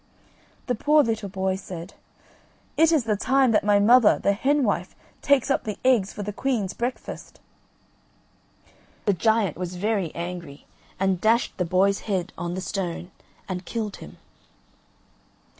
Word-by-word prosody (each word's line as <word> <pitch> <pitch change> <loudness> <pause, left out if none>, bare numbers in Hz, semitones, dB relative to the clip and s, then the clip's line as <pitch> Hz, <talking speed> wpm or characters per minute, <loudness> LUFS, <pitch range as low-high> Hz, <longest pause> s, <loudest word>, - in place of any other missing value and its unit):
The 250 - 0
poor 295 +6 +4
little 220 -4 -2
boy 190 0 -1
said: 180 -1 -8 0.8
"It 325 +1 +4
is 310 -6 +3
the 220 -2 0
time 260 +4 +2
that 210 - +3
my 205 0 +4
mother, 225 +2 +6
the 200 - +1
hen 275 +7 +1
wife, 185 -5 -1 0.3
takes 280 -1 +2
up - - +1
the 210 -2 -4
eggs 235 -7 +3
for 205 - -6
the 205 +1 -5
queen's 225 -5 -1
breakfast." 245 +2 -5 1.7
The 205 - +3
Giant 210 -1 +1
was 180 0 -5
very 195 -3 -1
angry, 170 -4 -7 0.3
and 190 -2 +1
dashed 230 +2 +2
the 180 - 0
boy's 190 +3 +2
head 185 -2 -1
on 175 0 -4
the 185 - -4
stone 180 -2 -4 0.4
and 185 -1 -4
killed 215 +1 -4
him. - - -12
205 Hz, 150 wpm, -24 LUFS, 185-230 Hz, 1.7 s, mother